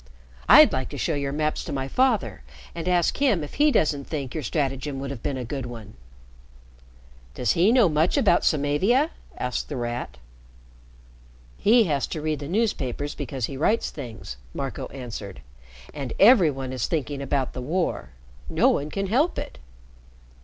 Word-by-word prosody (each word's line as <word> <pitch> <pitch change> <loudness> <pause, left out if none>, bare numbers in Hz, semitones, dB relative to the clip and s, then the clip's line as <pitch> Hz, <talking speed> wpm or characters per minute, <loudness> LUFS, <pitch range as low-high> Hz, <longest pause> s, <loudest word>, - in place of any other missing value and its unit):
"I'd - - +9
like 130 -1 -2
to - - -7
show 165 - -1
your 140 -1 -2
maps 150 +1 -1
to - - -6
my 135 -1 -2
father 250 - +1 0.3
and 170 +1 -5
ask 175 -2 +2
him 250 - +2
if 145 - -8
he 300 - +6
doesn't 145 - +1
think 140 -5 -4
your 155 - -3
stratagem 135 0 -2
would 135 0 -5
have 130 -5 -7
been 135 - -2
a 125 - -4
good 130 +1 -4
one." 110 -3 -9 1.4
"Does 120 +5 +1
he 180 +6 +4
know 240 -5 +5
much 155 +2 +1
about 175 - +3
Samavia?" 180 - +2 0.3
asked 125 0 -3
The 145 - -4
Rat. 120 - -4 1.4
"He 230 +2 +4
has 145 - 0
to 160 - -5
read 155 -1 -1
the 145 - -6
newspapers 145 - -1
because 130 -3 -4
he 135 - -7
writes 215 - +1
things," 115 - -8 0.2
Marco - - -4
answered. 110 - -8 0.5
"And 135 -5 -5
every 200 -6 +7
one 135 -2 -5
is 125 -4 -1
thinking 145 -3 -2
about 135 -1 -1
the 125 - -5
war. 130 - -2 0.4
No - - +3
one 145 +2 0
can 195 +4 -2
help 260 - +1
it." - - -6
145 Hz, 170 wpm, -25 LUFS, 130-175 Hz, 1.4 s, I'd